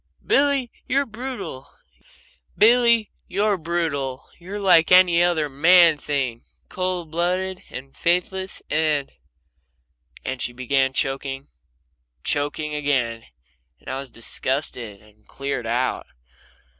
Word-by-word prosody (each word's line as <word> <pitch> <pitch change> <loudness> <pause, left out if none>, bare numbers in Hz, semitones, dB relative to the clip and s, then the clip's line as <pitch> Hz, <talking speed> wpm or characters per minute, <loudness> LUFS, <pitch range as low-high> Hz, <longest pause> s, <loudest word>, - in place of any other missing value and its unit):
"Billy, 275 -3 +2 0.2
you're 275 +2 +1
brutal 235 - -7 0.9
you're 230 -2 +3 1.1
like 180 -5 +5
any 180 -2 +6
other 165 -4 +1
man 165 +3 +5
thing 130 -6 -2 0.3
cold 185 -3 -3
blooded 180 +2 -1
and 135 +2 -9
faithless 185 +2 -1
and 155 -3 +1 0.6
" 65 -1 -28
And 130 -1 -3
she 120 - -2
began 130 +1 +1
choking 135 +1 -2 0.7
choking 150 +1 -1
again, 130 -6 -1 0.5
and - - -11
I 130 - -3
was 135 -1 -7
disgusted 115 -3 -3
and 105 0 -24
cleared 140 -4 -4
out. 125 +3 -1
150 Hz, 100 wpm, -23 LUFS, 130-185 Hz, 1.1 s, any